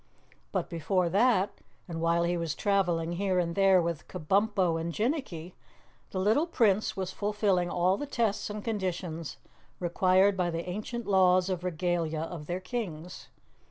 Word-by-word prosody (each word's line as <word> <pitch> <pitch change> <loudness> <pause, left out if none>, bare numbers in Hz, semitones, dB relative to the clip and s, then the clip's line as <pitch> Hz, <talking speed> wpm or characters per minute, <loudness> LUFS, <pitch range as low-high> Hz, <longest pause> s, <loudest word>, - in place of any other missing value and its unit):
But - - -1
before 175 +1 0
that, 200 0 +2 0.3
and 165 -2 -5
while 170 +1 +2
he 175 +1 +1
was 165 -2 -2
traveling 175 -5 +1
here 185 +1 0
and 170 -1 0
there 195 0 +5
with 170 -3 -2
Kabumpo 190 -1 +1
and 170 +1 -3
Jinnicky, 210 - -2 0.6
the - - -6
little 220 - +2
Prince 215 - +2
was 190 -1 -2
fulfilling 205 -3 0
all 180 +2 +2
the 290 - -5
tests 225 -6 -1
and 210 0 -5
conditions 180 -7 -3 0.4
required 185 +3 +3
by 180 -2 0
the 170 +1 -4
ancient 215 +5 -4
laws 185 -1 +4
of 180 -1 -3
Regalia 170 -2 -1
of 165 -2 -6
their 175 +1 -2
Kings. 185 -5 -6
185 Hz, 155 wpm, -29 LUFS, 170-200 Hz, 0.6 s, there